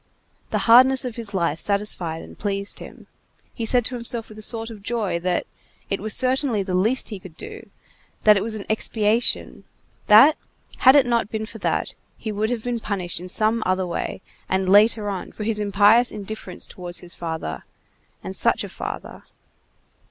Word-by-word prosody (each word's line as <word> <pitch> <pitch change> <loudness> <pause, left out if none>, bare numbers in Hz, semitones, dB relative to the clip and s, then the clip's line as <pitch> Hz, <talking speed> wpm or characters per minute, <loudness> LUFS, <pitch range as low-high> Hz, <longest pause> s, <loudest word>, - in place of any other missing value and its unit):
The - - 0
hardness 255 +3 +6
of 245 -3 -4
his 230 -4 -1
life 170 -5 0
satisfied 190 -5 -2
and - - -12
pleased 200 -1 -3
him. - - -11 0.5
He 230 -2 -4
said 245 0 +2
to 255 - -3
himself 235 -1 -3
with 215 0 -11
a - - -8
sort 225 +1 -1
of 215 -3 -10
joy 205 -5 -1
that— 180 0 -1 0.5
it 195 - 0
was 215 +1 +1
certainly 255 -4 +2
the 190 -1 -4
least 220 +8 +1
he 210 -4 -6
could 180 -3 -13
do; - - -10 0.5
that 210 -1 +7
it 195 - +1
was 220 +2 -3
an 205 - -6
expiation;—that, 220 +3 +2 0.4
had 260 +2 +7
it 280 -2 +6
not 235 -4 +1
been 220 -1 -3
for 225 0 -10
that, - - -1 0.2
he 220 - -5
would 215 +1 -1
have 240 -3 -2
been 245 -1 -2
punished 185 -6 -3
in 180 +1 -9
some 220 +4 +1
other 185 0 0
way 175 - -4 0.3
and 190 0 0
later 210 +2 +5
on 195 -3 -4
for 215 - -6
his 215 0 -1
impious 210 +4 +4
indifference 205 -2 -7
towards 175 -1 -6
his 175 0 -5
father, 160 - -5 0.6
and - - -6
such - - +1
a - - -6
father! - - -7
210 Hz, 180 wpm, -23 LUFS, 190-230 Hz, 0.6 s, that